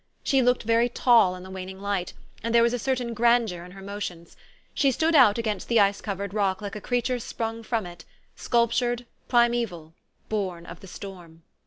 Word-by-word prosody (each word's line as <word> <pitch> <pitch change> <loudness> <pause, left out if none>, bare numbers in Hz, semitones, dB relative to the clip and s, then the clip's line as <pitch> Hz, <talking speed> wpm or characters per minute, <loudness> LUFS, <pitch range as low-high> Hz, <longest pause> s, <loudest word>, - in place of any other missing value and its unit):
She 270 -2 +3
looked 250 0 +2
very 230 +2 +2
tall 230 -6 +4
in 180 - -10
the 190 - -10
waning 190 0 -7
light, 200 -3 -2 0.3
and 230 0 -1
there 235 - +6
was 235 +1 +2
a 245 - -1
certain 245 -1 -1
grandeur 230 -6 +2
in 180 0 -12
her 195 0 -11
motions. 195 -4 -6 0.4
She 275 - +3
stood 320 +6 +1
out 250 -8 +6
against 215 -4 -2
the 235 -1 +3
ice 200 0 +3
covered 200 -1 -4
rock 195 -3 0
like 205 0 -6
a 210 - -6
creature 245 +2 -1
sprung 225 0 -4
from 225 -2 -2
it, 175 -1 -10 0.3
sculptured, 240 +1 0 0.2
primeval, 235 -10 +1 0.3
born 185 -5 -3
of 170 0 -10
the 195 - -13
storm. 175 -4 -10
215 Hz, 190 wpm, -26 LUFS, 190-240 Hz, 0.4 s, there